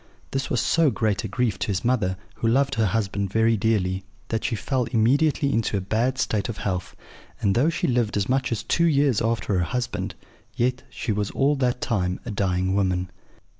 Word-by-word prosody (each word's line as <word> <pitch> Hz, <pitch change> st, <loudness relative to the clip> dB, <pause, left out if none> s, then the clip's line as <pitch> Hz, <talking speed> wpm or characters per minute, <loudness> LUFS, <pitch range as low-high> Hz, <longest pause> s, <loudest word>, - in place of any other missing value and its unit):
This 135 Hz, 0 st, -2 dB
was 125 Hz, -, +1 dB
so 165 Hz, -2 st, +3 dB
great 110 Hz, -5 st, 0 dB
a -, -, -2 dB
grief 105 Hz, -2 st, -1 dB
to -, -, -1 dB
his 100 Hz, +1 st, -1 dB
mother, 105 Hz, -7 st, +1 dB, 0.2 s
who 115 Hz, -, 0 dB
loved 135 Hz, +4 st, +2 dB
her 110 Hz, -4 st, +2 dB
husband 100 Hz, -1 st, -1 dB
very 110 Hz, +1 st, +3 dB
dearly, 95 Hz, -3 st, 0 dB, 0.3 s
that 115 Hz, -1 st, -1 dB
she -, -, 0 dB
fell 130 Hz, +3 st, -1 dB
immediately 135 Hz, +5 st, +2 dB
into 110 Hz, -2 st, +1 dB
a -, -, +1 dB
bad 115 Hz, +7 st, 0 dB
state 110 Hz, -2 st, 0 dB
of 115 Hz, -, -4 dB
health; 90 Hz, -3 st, -3 dB, 0.4 s
and 100 Hz, -, +2 dB
though 130 Hz, +9 st, +3 dB
she 165 Hz, -, -1 dB
lived 120 Hz, -5 st, +1 dB
as 100 Hz, -1 st, 0 dB
much 130 Hz, 0 st, 0 dB
as 115 Hz, -, -1 dB
two 170 Hz, -, +2 dB
years 140 Hz, -6 st, +3 dB
after 115 Hz, -2 st, 0 dB
her -, -, +2 dB
husband, 125 Hz, +7 st, -3 dB, 0.4 s
yet 125 Hz, +1 st, 0 dB
she 115 Hz, -, -3 dB
was 105 Hz, -1 st, -1 dB
all 140 Hz, +2 st, +2 dB
that 125 Hz, -1 st, 0 dB
time 95 Hz, -7 st, -1 dB
a 120 Hz, -, -4 dB
dying 95 Hz, -2 st, 0 dB
woman. 90 Hz, -2 st, 0 dB
115 Hz, 205 wpm, -24 LUFS, 100-125 Hz, 0.4 s, so